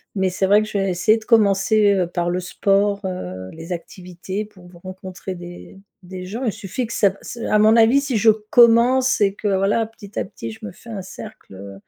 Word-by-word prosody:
mais 190 -2 0
c'est 190 +1 0
vrai 205 +2 +4
que - - -6
je 205 - -2
vais 195 0 0
essayer 200 +5 +2
de 220 - -16
commencer, 210 -1 +3
heu, 185 -3 0
par 175 0 -2
le 180 - -1
sport, 200 +2 0
heu, 95 - -6
les 165 +2 -10
activités 180 +3 -6
pour 190 -4 -17
v 175 -1 -16
rencontrer 185 0 -8
des 175 +2 -11 0.3
des 185 0 -8
gens. 220 +8 -6
Il 225 - +1
suffit 210 +4 -4
que 230 - -7
ça 205 - +3
b 195 - -11
ç - - -8
à 215 - +3
mon 215 +1 +5
avis 230 +4 +5
si 275 -4 -1
je 220 +2 +4
commence 235 +4 +4
et 200 -2 +2
que 210 - -4
voilà, 200 +3 +1
petit 210 -2 -14
à - - 0
petit, 115 -10 -8
je 110 - -14
me 100 - -7
fais 235 - -16
un 200 -3 -5
cercle, 190 - -11
heu, 100 +1 -10
195 Hz, 230 wpm, -20 LUFS, 180-220 Hz, 0.3 s, mon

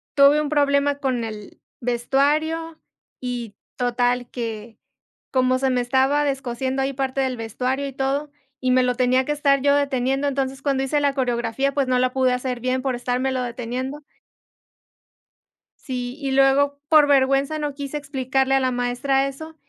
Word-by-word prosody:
tuve 285 +2 +6
un 295 - -2
problema 285 -1 +2
con 260 -4 -1
el 215 -2 -8 0.2
vestuario 295 +7 0 0.4
y 240 -4 -5 0.2
total 245 0 0
que 225 -2 -6 0.5
como 255 0 +2
se 265 - +1
me 250 -1 +1
estaba 265 +4 +2
descosiendo 265 -1 -2
ahí 270 +1 -1
parte 270 0 -1
del 260 -2 -1
vestuario 255 +5 -2
y 270 - -7
todo, 280 +2 -2 0.3
y 255 0 +1
me 255 0 +4
lo 250 -1 +1
tenía 255 +1 +2
que 295 - 0
estar 280 -2 +2
yo 285 0 +4
deteniendo, 275 0 0
entonces 270 -1 -2
cuando 275 -2 +1
hice 290 +2 +1
la 285 -1 +2
coreografía, 255 +1 -1
pues 275 -2 +1
no 250 -1 +2
la 255 0 +2
pude 260 -1 +2
hacer 250 -1 -3
bien 255 +1 0
por 260 -2 -1
estarmelo 250 +1 -1
deteniendo. 250 +4 -4 1.8
Sí, 250 -2 -4
y 275 - -2
luego, 275 +1 +3
por 305 -2 +6
vergüenza, 275 +2 +2
no 295 -2 -3
quise 280 +1 -5
explicarle 270 -2 -1
a 270 - +4
la 260 - +1
maestra 245 +3 0
eso. 315 +4 -8
265 Hz, 165 wpm, -22 LUFS, 250-280 Hz, 1.8 s, tuve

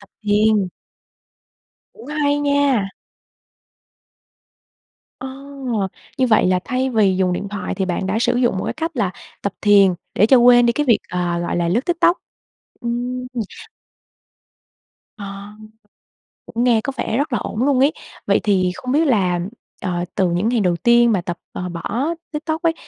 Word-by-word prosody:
tập 200 - -18
thiền. 210 -2 +2 1.2
Cũng 445 - -14
hay 290 -1 +1
nha! 285 -7 +2 2.3
Ờ, 260 - -6 0.9
như 260 - +3
vậy 215 -5 +4
là 185 0 +3
thay 255 +1 -1
vì 200 -5 +3
dùng 185 -1 +1
điện 195 +3 -3
thoại 205 -1 -4
thì 190 - -1
bạn 185 +1 -2
đã 200 +4 0
sử 245 - +1
dụng 240 -6 +1
một - - -3
cái - - -2
cách 325 +2 -3
là 200 -5 +1 0.3
tập 200 - -2
thiền 200 -3 +5 0.2
để 210 - +4
cho 260 +3 +6
quên 245 0 +6
đi 235 - +3
cái 295 +3 -1
việc, 235 - +5
ờ, 175 -1 -1
gọi 175 - -2
là, 170 -1 0
lướt 215 +8 +2
TikTok. 345 +1 +3 0.6
Ừm, 245 +1 -3
ừ. 235 - -2 1.8
À. 200 0 -8 0.9
Cũng 235 +1 -2
nghe 235 -3 +3
có 275 - -2
vẻ 225 - -1
rất 285 -2 -1
là 235 - +1
ổn 215 +5 -3
luôn 275 -3 +2
ấy. 285 +4 +4 0.3
Vậy - - +3
thì 185 -4 +2
không 255 0 -5
biết 310 +3 +3
là, 185 -8 +2 0.4
ờ, 175 -2 -2
từ 185 -2 +2
những 180 +6 0
ngày 240 -2 +1
đầu 180 -3 +2
tiên 235 +4 +4
mà 190 -4 +1
tập, 175 0 -5
ờ, 180 0 -5
bỏ 200 - -3 0.3
TikTok 315 +1 -3
ấy, 330 -1 +2
220 Hz, 170 wpm, -20 LUFS, 190-255 Hz, 2.3 s, cho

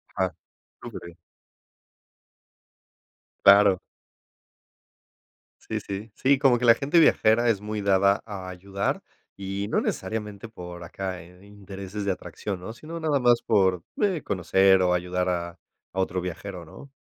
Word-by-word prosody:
Ah. 95 -1 0 0.5
Superbién. 85 -1 -9 2.3
Claro. 100 -1 +7 1.8
Sí, - - -4
sí. 100 +3 -7
Sí, 135 +5 +3
como 135 -4 +4
que 125 - -1
la 115 -1 +8
gente 145 +7 +2
viajera 120 -6 +4
es 105 -3 +1
muy 105 0 -4
dada 100 0 +3
a 100 -4 -7
ayudar 95 +2 -3 0.4
y 100 +1 -4
no - - +2
necesariamente 105 +1 -4
por 90 -4 -9
acá 95 +1 -5
en 90 +3 -17
intereses 100 0 -8
de 100 - +1
atracción, 95 +1 -5
¿no? 100 +5 -7
Sino 160 +8 -8
nada 155 -3 +1
más 120 -2 +4
por, 95 -5 +2 0.2
eh, 190 -6 +1
conocer 95 0 +3
o 90 -1 +3
ayudar 90 +1 -1
a 85 -1 -3 0.4
a - - -1
otro 95 -1 -1
viajero, 90 0 -6
¿no? 140 - -13
100 Hz, 135 wpm, -25 LUFS, 90-110 Hz, 2.3 s, la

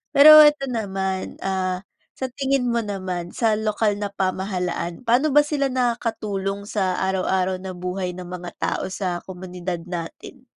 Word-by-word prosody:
Pero 305 +2 +10
'eto 295 -2 +6
naman, 190 -4 -3
ah, 185 -1 -1 0.3
sa 260 -1 -4
tingin 270 0 0
mo 235 - +1
naman, 185 -5 -4
sa 225 -2 +2
lokal 215 -1 0
na 205 - -1
pamahalaan. 185 -1 -3
Paano 250 +5 +3
ba 295 - +8
sila 290 -2 0
nakakatulong 225 -6 -2
sa 195 -3 -1 0.2
araw-araw 185 0 0
na 185 0 -7
buhay 180 0 -3
ng 180 - -7
mga 180 0 -7
tao - - -1
sa 185 -2 -3
komunidad 180 -2 -5
natin? 175 +9 -7
195 Hz, 145 wpm, -23 LUFS, 185-235 Hz, 0.3 s, Pero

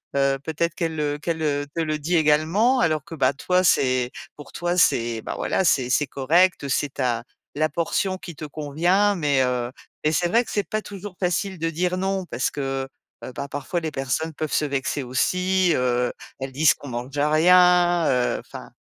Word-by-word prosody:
heu, 135 0 +2
peut-être 165 +1 -2
qu'elle, 160 -3 -2
heu, 145 -1 -1
qu'elle, 160 +1 -3
heu, 145 -1 0
te 165 - -2
le 155 -1 -1
dit 160 +4 -1
également 160 - +3
alors 155 - +1
que, 165 - -9
bah, 135 -1 +2
toi 180 +6 +1
c'est 130 -6 +2 0.2
pour 145 - -12
toi 175 +1 -2
c'est, 115 -8 +2
bah, - - -4
voilà, 190 - 0
c'est 130 -6 +2
c'est 145 +3 +2
correct, 155 +6 +2
heu, - - -4
c'est 140 +1 -1
ta 120 -3 -1 0.3
la 155 +1 +2
portion 185 +3 -1
qui 170 -4 -9
te 155 - -7
convient 170 +8 +1
mais 145 -5 +1
heu 125 -1 -1 0.3
et 155 - +2
c'est 175 +2 +1
vrai 235 +6 +2
que - - -8
c'est 205 -2 -1
pas 215 0 -2
toujours 200 -1 -9
facile 185 +1 -1
de 165 - 0
dire: 180 +3 -1
«Non», 190 0 -1
parce 125 - -1
que, 135 -1 -3 0.4
heu, 130 - -6
bah, 140 - -5
parfois 145 +5 -3
les 160 - -3
personnes 145 +4 -2
peuvent 155 0 -4
se 150 - +2
vexer 140 0 -2
aussi, 180 +8 +1
heu, 125 -1 0 0.3
elles 135 0 -5
disent 150 +4 +4
qu'on 145 - -12
mange 125 +4 -6
rien, 175 +3 +4
heu, 125 -2 +1
enfin - - -11
155 Hz, 200 wpm, -23 LUFS, 135-180 Hz, 0.4 s, disent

